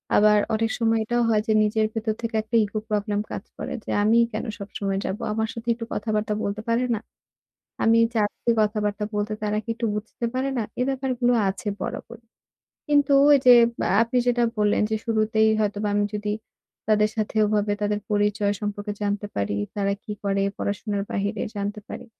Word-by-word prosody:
আবার 210 0 +6 0.2
অনেক 225 +1 +1
সময় 225 -1 +2
এটাও 240 +2 0
হয় 215 -1 +3
যে 220 - +3
নিজের 215 +1 +1
ভেতর 220 -1 -1
থেকে 230 -1 -3
একটা 220 +2 -4
ইগো 210 +1 -3
প্রবলেম 205 -1 0
কাজ - - -4
করে - - -5
যে, - - -10
"আমিই 230 +2 +5
কেন - - -3
সবসময় 195 -1 -3
যাব? 195 - -2 0.2
আমার 220 +1 0
সাথে 230 -1 -9
একটু 230 0 -6
কথাবার্তা 215 0 -1
বলতে 205 +1 -2
পারে 230 +2 +2
না? 210 - -3 0.9
আমি 225 0 +5 0.2
চাচ্ছি 215 +1 0
কথাবার্তা 210 -1 0
বলতে 210 +1 -1
তারা 210 0 0
কি - - -29
একটু 230 0 -2
বুঝতে 215 +3 -4
পারে 260 +1 0
না?" 230 - +1 0.2
এ - - +4
ব্যাপারগুলো 260 -2 0 0.2
আছে 195 +2 -4
বরাবরই। 235 0 -6 0.6
কিন্তু 290 -1 +3 0.2
এই 280 - +4
যে 250 - +10 0.3
আ - - 0
আপনি 240 +2 0
যেটা 240 -1 +2 0.2
বললেন 210 0 +2
যে 220 - +1
শুরুতেই 220 -1 +2
হয়তোবা 210 0 0
আমি 205 0 +2
যদি 210 0 -2 0.6
তাদের 210 0 +4
সাথে 215 -2 -2
ওভাবে 210 0 +1
তাদের 205 0 0
পরিচয় 205 0 +1
সম্পর্কে 205 0 -3
জানতে 205 0 -1
পারি, 100 0 -1 0.2
তারা 200 -1 0
কি 210 - -5
করে 195 -1 0
পড়াশোনার 200 0 -2
বাহিরে 200 +1 -2
জানতে 205 +1 -3
পারি, - - -7
215 Hz, 180 wpm, -24 LUFS, 205-230 Hz, 0.9 s, যে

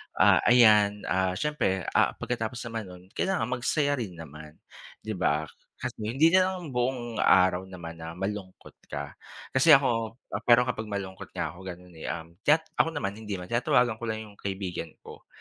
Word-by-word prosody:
ah, - - +6
ayan, 105 -4 +5
ah, 95 0 +1
siyempre, 95 - 0
ah, - - +3
pagkatapos 120 0 -4
naman 115 -3 -5
no'n, 90 -1 -12
kailangan 185 -11 -1
magsaya 140 +3 0
rin 100 -7 -5
naman, 75 -1 -11 0.5
'di 110 - -4
ba? 75 -2 +1 0.4
Kasi - - -4
hindi 130 +10 +3
na 185 0 +5
lang 180 -5 -5
buong 120 -2 -2
araw 95 0 +4
naman 85 -3 -9
na 80 0 -7
malungkot 95 0 -6 0.2
ka. 70 0 -5 0.4
Kasi 145 +4 +7
ako 115 -5 0 0.3
pero 120 0 +7
kapag 115 -3 -3
malungkot 100 -2 -6
nga - - -2
ako 85 - -14
gano'n, 90 0 -9
eh, - - -6
um, 80 0 -5
chat 150 +8 +3 0.2
ako - - +5
naman, 100 -9 -1
hindi 105 -2 -4
naman. 90 +1 -8
Tinatawagan 120 -1 +2
ko 120 - -5
lang 110 0 -3
yung 105 -1 -15
kaibigan 95 -4 -4 0.2
ko. - - -13
105 Hz, 175 wpm, -27 LUFS, 90-125 Hz, 0.5 s, Kasi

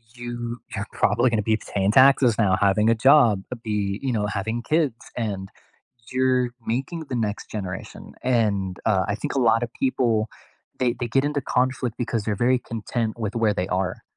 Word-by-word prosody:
you 120 0 -5 0.2
you're 100 - -3
probably 120 +5 +2
gonna 110 -2 +1
be 110 +1 +2
paying 100 -2 -1
taxes 130 -2 +5
now, 95 -4 +3
having 100 +2 +3
a - - +3
job, 120 -5 +5
uh, - - -2
be, 105 -2 -2
you 130 -2 0
know, 105 -2 0
having 105 +3 -2
kids, 150 -5 +1 0.2
and 100 -5 -3 0.6
you're 130 -1 +2 0.2
making 140 +8 -3
the 130 - -2
next 110 -3 -3
generation, 95 -3 -7
and, 105 -7 0
uh, 95 -4 +3
I 105 - 0
think 105 - -4
a - - +2
lotta 115 -1 +3
people, 115 -4 +1 0.5
they 125 -2 +2
they 120 - -2
get 135 +4 +1
into 145 -1 -1
conflict 125 -2 -1
because 115 -3 -2
they're 105 0 -1
very 130 0 +3
content 115 0 -4
with 110 -1 -3
where 110 -2 +2
they 90 -2 -1
are. 95 0 -2
115 Hz, 180 wpm, -24 LUFS, 105-125 Hz, 0.6 s, taxes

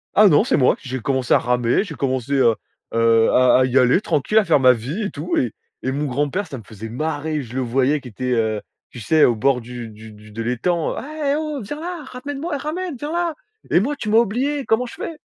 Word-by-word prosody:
Ah 210 +1 +7
non, 150 -6 +5
c'est - - +1
moi. 130 - +4
J'ai 130 0 -5
commencé 130 +1 0
à - - +6
ramer, 125 +5 +1
j'ai 165 -8 -8
commencé, 130 0 -2
heu 125 -5 +4 0.4
heu, 115 0 +4
à 130 0 +5
à - - +4
y 130 +1 +3
aller 125 +6 +4
tranquille, 200 +1 0
à 215 - +5
faire 160 -4 +4
ma 130 -1 +6
vie 130 - -4
et 205 - -2
tout 155 +1 -3
et 120 -4 0 0.3
et 130 - -2
mon 145 +3 -2
grand-père- 145 +9 -1
ça 140 - -7
me - - -13
faisait 110 +1 -9
marrer- 155 +4 -2
je 120 -2 -10
le 130 - 0
voyais 130 +4 +1
qui 130 - -12
était, 125 +4 -4
heu, 110 -3 0 0.3
tu 125 - -9
sais, 155 +7 +3
au 120 - +3
bord 130 +3 +2
du 120 -1 -8
du 110 +1 -12
du 105 0 -15
de 115 - -5
l'étang: 155 +9 0
«Ah! 295 0 -3
Eh! - - +2
Oh! 305 -2 -3
Viens 295 +9 -6
là, 345 -1 -5
ramène 270 +2 -7
moi, 300 -1 -3
ramène, 320 +3 -4
viens 295 +5 -5
là! 340 -1 0 0.4
Et - - +5
moi, 280 +9 -1
tu 215 - -5
m'as 220 - +4
oublié, 265 +6 0
comment 225 +3 +1
je 240 - -9
fais?» 325 -2 -6
140 Hz, 250 wpm, -21 LUFS, -, 0.4 s, Ah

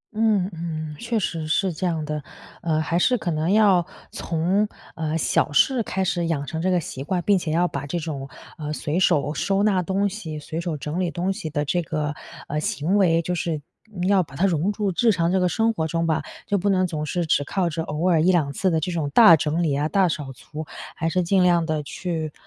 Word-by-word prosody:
嗯 215 -4 +2
嗯， 155 -2 -5
确 235 -1 -1
实 165 -6 -2
是 180 +3 +1
这 180 +4 -2
样 165 -3 -1
的。 150 -1 -4 0.4
呃， 160 -2 0
还 165 +2 0
是 250 +7 +3
可 175 - -2
能 160 +3 0
要 200 -5 +5 0.3
从， 180 +6 0 0.3
呃， 160 0 -2
小 150 - +1
事 250 - +3
开 190 -2 -2
始 175 -2 0
养 150 -4 -1
成 160 +2 -4
这 185 - +1
个 180 -1 +3
习 135 -4 -6
惯。 150 - -4
并 200 -1 +4
且 170 -3 -3
要 175 +3 +2
把 140 -4 -5
这 175 - -2
种， 145 -4 -5 0.3
呃， 150 -1 -4
随 155 +3 -2
手 150 -5 +2
收 195 +5 0
纳 200 -3 +3
东 195 +3 0
西， 180 -7 -6
随 155 +2 -5
手 170 -2 -3
整 150 +4 -4
理 180 -2 0
东 180 +3 -1
西 160 - -5
的 145 -1 -1
这 175 +5 0
个， 150 -2 -2 0.3
呃， 150 - -2
行 155 +4 -1
为， 165 -4 +4
就 180 +2 -3
是 165 -3 -2 0.5
要 195 -2 +4
把 140 -4 -14
它 175 - +2
融 180 +1 +1
入 205 -3 0
日 235 -2 +5
常 170 -3 +1
这 190 - +2
个 180 - +2
生 225 +6 +2
活 160 -7 -1
中 165 +1 -1
吧。 160 -1 +1 0.3
就 205 - +1
不 200 +2 0
能 185 -1 +3
总 155 -4 -3
是 175 +3 -1
只 150 -2 +2
靠 180 +2 0
着 160 0 -3
偶 160 +3 -1
尔 165 -3 +4
1-2 170 -4 +3
次 185 +7 0
的 160 - +2
这 170 +4 -2
种 160 -4 -1
大 215 +2 +8
整 155 +2 0
理 155 -4 +1
啊， 145 +2 0
大 190 +2 +2
扫 145 -4 -4
除， 150 +5 -8 0.3
还 165 - -2
是 180 +2 +1
尽 185 +2 +3
量 175 -2 +3
地 155 -1 -1
去， 160 0 -4
170 Hz, 250 characters per minute, -23 LUFS, 155-185 Hz, 0.5 s, 大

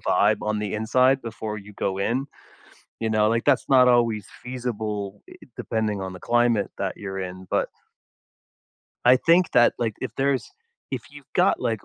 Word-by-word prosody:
vibe - - +2
on 105 0 -1
the 105 -1 -3
inside 130 +5 +2
before 110 -2 -5
you 105 0 -11
go 95 -1 -2
in, 125 +7 -1 0.7
you 115 - -1
know, 110 -1 +3
like, 115 +1 0
that's 145 -3 +3
not 130 -2 +6
always 115 -4 +2 0.2
feasible, 110 -5 -4
i - - -12 0.2
depending 110 -3 -2
on 95 0 -4
the 90 - -9
climate 120 -2 +2
that 100 -1 -3
you're 95 -2 -5
in, 95 0 -7
but - - 0 1.4
I 125 +1 +7
think 170 +6 +3
that, 120 - +5
like, 115 -3 -1
if 130 - -3
there's 135 -1 0 0.4
if - - -3
you've - - -15
got - - +3
like - - -2
110 Hz, 170 wpm, -24 LUFS, 105-125 Hz, 1.4 s, I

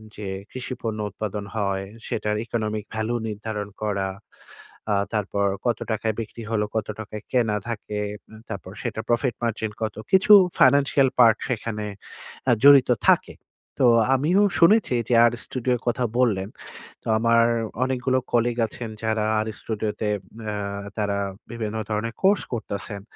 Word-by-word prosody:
যে 105 -1 -6 0.2
কৃষি 130 0 -5
পণ্য 110 -2 -3
উৎপাদন 105 -1 -5
হয় 100 -2 -1 0.2
সেটার 105 -1 -1
ইকোনমিক 110 -2 -2
ভ্যালু 110 +2 -1
নির্ধারণ 105 -1 -4
করা। 100 -2 -1 0.9
আ - - +3 0.2
তারপর 100 -1 0 0.2
কত 120 - +1
টাকায় 110 0 0
বিক্রি 115 +1 -6
হলো? 105 -2 +1
কত 110 -2 -1
টাকায় 110 0 -7
কেনা 115 -4 +2
থাকে? 105 -2 -4 0.5
তারপর 95 -1 -6
সেটা 110 - -3
প্রফিট 120 0 +1
মার্জিন 110 -2 -1
কত? 110 - -2 0.2
কিছু 190 +2 +5 0.3
ফাইন্যান্সিয়াল 140 -1 +5
পার্টস 115 -2 +6
সেখানে 110 -3 -3 0.6
আ - - +6
জড়িত 140 -2 +8 0.2
থাকে। - - +3 0.5
তো - - +7 0.3
আমিও 160 +9 +3 0.2
শুনেছি 190 - +5
যে - - +2
আর্ 120 - +3
স্টুডিওর 125 -1 -1
কথা 125 +1 +1
বললেন। 105 -6 +2 0.5
তো - - -11
আমার 115 +1 +4 0.4
অনেকগুলো 130 0 +1
কলিগ 120 0 +2
আছেন 115 +1 -7
যারা 110 -1 0
আর্ 110 - -1
স্টুডিও 110 -1 -2
তে 105 - +1 0.4
আ - - -4 0.4
তারা 100 -1 0 0.3
বিভিন্ন 110 -2 -4
ধরনের 110 +2 -2
কোর্স 200 +1 +4
করতেছেন। 100 -2 -4
110 Hz, 145 wpm, -24 LUFS, 105-125 Hz, 0.9 s, জড়িত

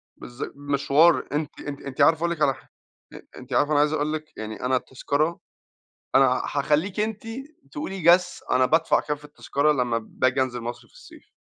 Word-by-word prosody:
بالظ 120 +2 -8
مشوار، 145 +3 +3
أنتِ 150 0 -3
أنتِ 145 -1 -7
أنتِ 135 -2 -4
عارفة 165 -1 +5
أقُول 170 +1 0
لِك 165 -2 -4
علي 140 -2 +4
ح - - -18 0.4
أ - - -10 0.2
أنتِ - - -9
عارفة 145 - +2
أنا 145 - +4
عايز 150 +1 +3
أقُول 155 0 -1
لِك 155 0 -7
يعني 110 +1 -6
أنا 130 +1 +2
التذكرة 145 +5 -1 0.8
أنا - - +7
هأخلّيكِ 165 +7 0
أنتِ 215 0 -2 0.5
تقولِي، 195 - -5
guess، 175 +2 +3
أنا 130 - +4
بادفع 160 +5 +3
كام 150 - -3
في 150 - -15
التذكرة 145 0 0
لمّا 125 -5 0
بآجي 130 +3 0
أنزل 125 -2 -2
مصر 120 +1 -7
في - - -30
الصيف؟ - - -16
145 Hz, 190 wpm, -24 LUFS, 130-165 Hz, 0.8 s, أنا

